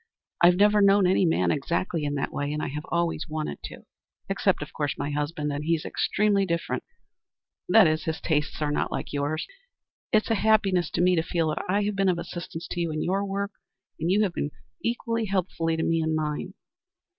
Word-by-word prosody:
I've 175 Hz, +1 st, +7 dB
never 210 Hz, +2 st, +4 dB
known 200 Hz, 0 st, +5 dB
any 185 Hz, 0 st, +3 dB
man 165 Hz, -, +2 dB
exactly 165 Hz, +2 st, -1 dB
in 145 Hz, 0 st, -1 dB
that 140 Hz, -, -2 dB
way, 145 Hz, 0 st, -2 dB
and 150 Hz, -, -2 dB
I -, -, -2 dB
have 150 Hz, +2 st, -6 dB
always 170 Hz, -1 st, -1 dB
wanted 155 Hz, -, -4 dB
to. -, -, -10 dB, 0.4 s
Except, -, -, +1 dB
of -, -, -12 dB
course, 145 Hz, -1 st, -2 dB
my 145 Hz, +1 st, -3 dB
husband. 150 Hz, 0 st, -2 dB
And 145 Hz, +1 st, -3 dB
he's 165 Hz, 0 st, 0 dB
extremely 205 Hz, -1 st, +1 dB
different 170 Hz, -3 st, -2 dB, 0.9 s
that 220 Hz, -3 st, +7 dB
is, 155 Hz, 0 st, +1 dB
his 160 Hz, -1 st, -2 dB
tastes 150 Hz, -1 st, -1 dB
are 145 Hz, -, 0 dB
not 150 Hz, -, -1 dB
like -, -, -4 dB
yours. 145 Hz, +2 st, -1 dB, 0.7 s
It's 215 Hz, +1 st, +2 dB
a 210 Hz, -4 st, +1 dB
happiness 200 Hz, -5 st, +3 dB
to 175 Hz, -, +1 dB
me 180 Hz, 0 st, +4 dB
to -, -, +4 dB
feel 165 Hz, -1 st, 0 dB
that 155 Hz, -, -2 dB
I 200 Hz, +2 st, +2 dB
have 205 Hz, 0 st, -1 dB
been 195 Hz, -1 st, +2 dB
of 180 Hz, -, +1 dB
assistance 170 Hz, -1 st, -6 dB
to 175 Hz, -, -3 dB
you 170 Hz, -, 0 dB
in 155 Hz, 0 st, -2 dB
your 195 Hz, +3 st, 0 dB
work, 200 Hz, +1 st, -2 dB, 0.5 s
and 165 Hz, +2 st, -1 dB
you 205 Hz, +3 st, +4 dB
have 190 Hz, -4 st, -1 dB
been 145 Hz, -, -2 dB, 0.3 s
equally 230 Hz, -1 st, -1 dB
helpful 185 Hz, -4 st, -1 dB
to 165 Hz, 0 st, +1 dB
me 165 Hz, 0 st, +1 dB
in 160 Hz, 0 st, 0 dB
mine. 150 Hz, -1 st, -3 dB
170 Hz, 210 wpm, -26 LUFS, 155-195 Hz, 0.9 s, I've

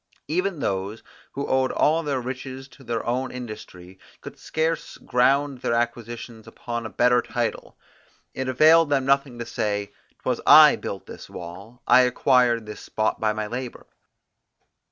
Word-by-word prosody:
Even 175 Hz, +1 st, -1 dB
those, 100 Hz, +3 st, -3 dB, 0.3 s
who 140 Hz, +1 st, -3 dB
owed 130 Hz, 0 st, +1 dB
all 160 Hz, +2 st, +2 dB
their 145 Hz, -4 st, -2 dB
riches 130 Hz, +1 st, -6 dB
to 135 Hz, -, -17 dB
their 115 Hz, -2 st, -3 dB
own 130 Hz, +2 st, -1 dB
industry, 95 Hz, -6 st, -9 dB, 0.2 s
could -, -, -11 dB
scarce 160 Hz, 0 st, -2 dB
ground 135 Hz, +2 st, +1 dB
their 115 Hz, -, -1 dB
acquisitions 120 Hz, -1 st, -4 dB
upon 120 Hz, -1 st, -5 dB
a -, -, -10 dB
better 125 Hz, +1 st, +3 dB
title. 120 Hz, 0 st, -4 dB, 0.6 s
It 130 Hz, 0 st, -4 dB
availed 155 Hz, +4 st, +5 dB
them 135 Hz, -2 st, +1 dB
nothing 140 Hz, -2 st, +1 dB
to 120 Hz, -, -5 dB
say, 100 Hz, -2 st, -2 dB, 0.3 s
'Twas -, -, -1 dB
I -, -, +9 dB
built -, -, -6 dB
this -, -, -11 dB
wall; 100 Hz, +8 st, -10 dB
I 130 Hz, -, +6 dB
acquired 125 Hz, -2 st, +2 dB
this 105 Hz, -, -9 dB
spot 110 Hz, 0 st, -2 dB
by 110 Hz, -1 st, +1 dB
my 105 Hz, 0 st, -3 dB
labour. 125 Hz, +3 st, -6 dB
125 Hz, 155 wpm, -24 LUFS, 115-135 Hz, 0.6 s, I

